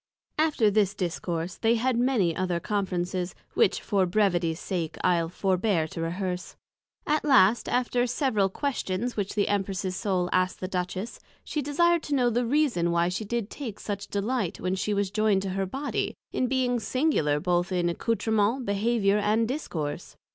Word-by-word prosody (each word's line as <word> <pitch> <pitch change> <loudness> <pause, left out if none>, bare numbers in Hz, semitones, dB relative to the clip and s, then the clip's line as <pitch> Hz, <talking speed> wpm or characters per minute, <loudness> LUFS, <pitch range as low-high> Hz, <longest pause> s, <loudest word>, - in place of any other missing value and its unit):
After 295 -9 +3
this 205 -1 +2
Discourse, 175 -1 -3
they 225 +1 +2
had 250 +2 +1
many 235 -9 +2
other 180 -2 -1
Conferences, 185 -2 -2 0.2
which - - +2
for 195 -3 +1
brevity's 175 -4 +1
sake 165 -4 -3
I'le 170 -2 +2
forbear 185 -2 +1
to 165 - -6
rehearse. 180 +1 -3 0.5
At 305 +1 +1
last, 240 -6 +4
after 245 0 +1
several 235 -6 +1
Questions 245 -2 -2
which 200 -2 -3
the 205 - +2
Empress's 190 -2 -1
Soul 180 -1 0
asked 185 0 +1
the 185 - -3
Duchess, 185 +4 -4 0.2
she 300 - -2
desired 340 +4 +2
to 290 - -2
know 245 -3 +3
the 240 +1 0
reason 250 - +2
why 170 0 +2
she 190 +4 -3
did 230 0 -3
take 235 -8 -6
such 205 -1 -4
delight, 205 -2 -2
when 185 0 -1
she 190 +2 -1
was 200 -2 0
joyned 210 -2 +2
to 195 - -3
her 195 0 -1
Body, 270 +9 -3 0.2
in 255 - 0
being 250 -1 +1
singular 225 - +1
both 175 +2 0
in 175 -2 +1
Accoustrements, 220 +5 0
Behaviour, 205 0 +2
and 215 +2 +2
Discourse? 170 - -4
200 Hz, 165 wpm, -27 LUFS, 180-240 Hz, 0.5 s, last